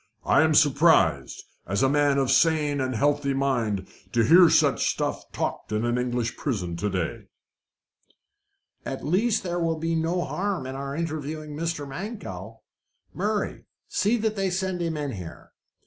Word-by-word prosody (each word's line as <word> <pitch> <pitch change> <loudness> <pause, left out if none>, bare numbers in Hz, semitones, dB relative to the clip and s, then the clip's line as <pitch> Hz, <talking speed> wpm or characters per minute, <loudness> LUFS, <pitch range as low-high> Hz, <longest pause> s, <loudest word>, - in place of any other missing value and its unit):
"I - - +4
am - - +3
surprised, - - +3 0.2
as 100 +8 0
a - - +5
man 145 0 +2
of 135 -1 +1
sane 145 0 +3
and 130 -1 -2
healthy 145 +2 +1
mind, 115 -8 0 0.3
to 120 -1 +3
hear 170 +7 +7
such - - +3
stuff - - -3
talked - - -4
in 105 +2 0
an 120 +1 0
English 120 -1 -2
prison 100 - -2
of 85 - -5
to 105 +4 -1
day." 90 -4 -3 1.6
"At 135 - -5
least 210 +8 +1
there 175 -1 -2
will 165 -1 0
be 165 +1 -2
no 165 +2 0
harm 195 -7 -2
in 130 - -5
our 140 +1 -5
interviewing 155 -2 -4
Mr. 160 -2 -3
Mankell. 125 - -7 0.5
Murray, 210 +3 -2 0.2
see 215 +4 +1
that 220 -1 -1
they 195 -2 0
send 185 0 -2
him 165 -2 -1 0.2
here." 90 -7 -9
145 Hz, 160 wpm, -25 LUFS, 125-170 Hz, 1.6 s, hear